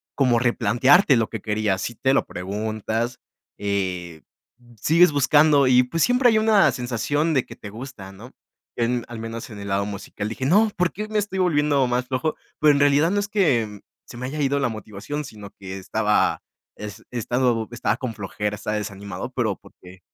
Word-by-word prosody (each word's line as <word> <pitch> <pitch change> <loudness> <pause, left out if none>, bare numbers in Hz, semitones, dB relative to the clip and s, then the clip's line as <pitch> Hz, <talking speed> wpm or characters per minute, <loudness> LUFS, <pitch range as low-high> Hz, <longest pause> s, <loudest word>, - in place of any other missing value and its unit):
como 125 -4 +3
replantearte 125 - +4
lo 110 - +1
que 110 - -6
quería. 105 -2 0
Si 120 +4 -4
te 130 +3 +1
lo - - +2
preguntas, 110 +5 -3 0.4
eh, 90 -5 -3 0.6
sigues 170 +2 +5
buscando 145 0 +4
y 125 0 +6
pues 165 +6 -1
siempre 245 0 +4
hay 220 - +3
una 215 -2 +4
sensación 135 +6 -1
de 130 -4 +1
que - - -10
te 100 - -10
gusta, 110 -4 -9
¿no?, 110 +6 -13 0.5
en 120 0 0
al 120 - -7
menos 115 +1 -6
en 110 - -9
el 100 - -7
lado 100 +1 0
musical. 100 +1 -5
Dije: 130 +4 -4
"No, 210 +9 +4
¿por 175 -1 +1
qué 210 +3 -5
me 215 - -1
estoy 200 -2 -3
volviendo 145 -6 +2
más 125 +1 0
flojo?". 135 +5 -1 0.2
Pero 155 -1 +6
en 140 - +1
realidad 145 +3 +4
no 205 - +1
es 205 - -2
que 125 - +1 0.2
se - - -12
me 125 +1 -5
haya 150 +3 -5
ido 140 0 +1
la 135 - +1
motivación, 110 +7 -6
sino 105 -4 -10
que 95 0 -7
estaba 105 +2 +1 0.4
es 105 -1 -8
estado 120 -1 0
estaba 120 - -1
con 125 -3 -4
flojera, 105 0 -4
estaba 105 +1 -3
desanimado, 100 -2 -6
pero - - -1
porque 90 +1 -16
120 Hz, 190 wpm, -23 LUFS, 105-145 Hz, 0.6 s, y